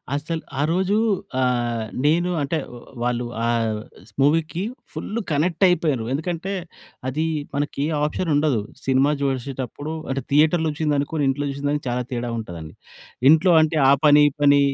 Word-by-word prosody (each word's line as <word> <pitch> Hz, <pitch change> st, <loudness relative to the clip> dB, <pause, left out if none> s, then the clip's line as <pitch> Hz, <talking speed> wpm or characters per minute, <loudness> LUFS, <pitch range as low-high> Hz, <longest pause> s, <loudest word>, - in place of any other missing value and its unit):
అసలు 160 Hz, +3 st, -3 dB, 0.2 s
ఆ -, -, +2 dB
రోజూ 190 Hz, +3 st, +1 dB, 0.5 s
ఆహ్, 120 Hz, -2 st, 0 dB, 0.2 s
నేను 170 Hz, +4 st, +3 dB
అంటే 145 Hz, +3 st, -1 dB, 0.5 s
వాళ్ళు 120 Hz, 0 st, -1 dB, 0.2 s
ఆ -, -, +1 dB, 0.6 s
స్ -, -, -26 dB
మూవీకి 160 Hz, +5 st, +2 dB, 0.3 s
ఫుల్లు 230 Hz, +3 st, -4 dB
కనెక్టయిపోయారు. 160 Hz, -, +2 dB
ఎందుకంటే 175 Hz, +6 st, -3 dB, 0.5 s
అది 150 Hz, +5 st, -1 dB, 0.3 s
మనకి 145 Hz, -1 st, -2 dB, 0.2 s
ఆప్షనుండదు. 150 Hz, -4 st, +1 dB, 0.3 s
సినిమా 135 Hz, +2 st, +3 dB
చూషేటప్పుడు 135 Hz, +1 st, -3 dB, 0.2 s
అంటే 135 Hz, 0 st, -1 dB
థియేటర్‌లో 160 Hz, +2 st, +4 dB
వచ్చిందనుకుని 150 Hz, 0 st, -1 dB
ఇంట్లో 145 Hz, +2 st, -1 dB
చూసిన 140 Hz, +1 st, -6 dB
దానికి 145 Hz, 0 st, -2 dB
చాలా 125 Hz, +1 st, -1 dB
తేడా 120 Hz, -1 st, -2 dB
ఉంటదండి. 85 Hz, -8 st, -7 dB, 0.6 s
ఇంట్లో 160 Hz, +4 st, +5 dB
అంటే 155 Hz, 0 st, +1 dB
ఆ -, -, +7 dB
పని, 150 Hz, 0 st, +7 dB
ఈ -, -, -16 dB
పని, 145 Hz, 0 st, +6 dB
145 Hz, 135 wpm, -22 LUFS, 135-160 Hz, 0.6 s, ఆ